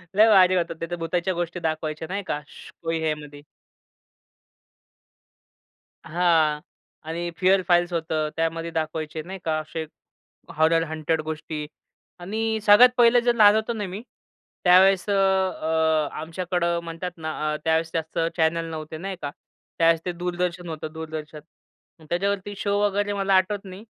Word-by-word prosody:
लय 215 +2 +7
भारी 185 -3 +6
होतं. 170 -2 0
ते - - -1
तर 175 - 0
भुताच्या 170 +2 -1
गोष्टी 175 0 -3
दाखवायच्या 155 -1 -3
नाही 200 +2 -3
का, 145 - -2
शु - - -14
कोई 165 0 -1
हे 155 -1 +1
मधी. 145 -1 -12 2.6
हां. 160 -3 +2 0.5
आणि 170 +1 -3
फिअर 190 +1 +4
फाइल्स 175 0 +3
होतं. 160 -2 -1
त्यामध्ये 165 +1 -2
दाखवायचे 155 0 -3
नाही 190 +4 -8
का, 155 -1 +1
असे 160 +1 -5 0.7
हॉरर 165 +1 +4
हंटेड 160 0 -1
गोष्टी 155 -1 -5 0.5
आणि 220 +4 -2
सगळ्यात 215 +5 +8
पहिलं 240 0 +6
जर 240 0 +1
लहान 210 -2 +7
होतो 220 +2 0
ना 210 -2 -3
मी 195 +4 -6 0.6
त्यावेळेस 185 +1 +5
अ, - - +2
अ, 160 -5 +1
आमच्याकडं 170 +1 -1
म्हणतात 170 +2 -5
ना 160 -1 -4 0.2
अ, - - -1
त्यावेळेस 160 0 +1
जास्त 160 +1 -3 0.2
चॅनल 165 +1 +1
नव्हते 155 0 -6
नाही 190 +3 -5
का? 145 -1 -4 0.5
त्यावेळेस 165 0 +4
ते 180 - -1
दूरदर्शन 175 0 -3
होतं, 155 -1 -6
दूरदर्शन. 155 -1 -7 0.7
त्याच्यावरती 200 +3 -1
शो 200 0 0
वगैरे 205 0 +1
मला 195 -1 0
आठवत 195 +2 +1
नाही, 190 +3 -10
170 Hz, 150 wpm, -24 LUFS, 160-190 Hz, 2.6 s, सगळ्यात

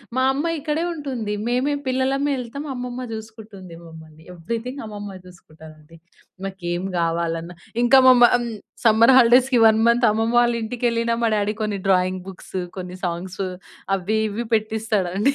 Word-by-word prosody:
మా 260 - +2
అమ్మ 290 +4 -2
ఇక్కడే 305 +3 -2
ఉంటుంది. 255 -9 -4
మేమే 255 +4 0
పిల్లలమే 270 +2 0
ఎళ్తాము 280 +5 -7
అమ్మమ్మ 250 0 -5
జూసుకుంటుంది 220 -5 -10
మమ్మల్ని. 160 -1 -14
ఎవరీథింగ్ 230 - -5
అమ్మమ్మ 205 -2 -8
జూసుకుంటదండి. 160 -2 -16 0.5
మాకేమి 185 -1 -4
గావాలన్నా 165 0 -2 0.3
ఇంకా 255 +3 +6
మామమ్ 245 -1 +5 0.4
సమ్మర్ 225 +3 +6
హాలిడేస్‌కి 250 +1 +5
1 220 - +4
మంత్ 235 +1 +3
అమ్మమ్మ 225 +2 0
వాళ్ళ 240 0 +3
ఇంటికెళ్ళినా 230 0 -1
మా - - +3
డ్యాడీ 205 +1 0
కొన్ని. 210 -1 -2
డ్రాయింగ్ 185 0 +2
బుక్స్ 190 0 -8 0.2
కొన్ని 180 0 -6
సాంగ్స్ 180 +2 -4 0.5
అవ్వి 200 +4 -1
ఇవ్వి 230 +4 -4
పెట్టిస్తాడండి 215 0 0
220 Hz, 135 wpm, -22 LUFS, 185-245 Hz, 0.5 s, ఇంకా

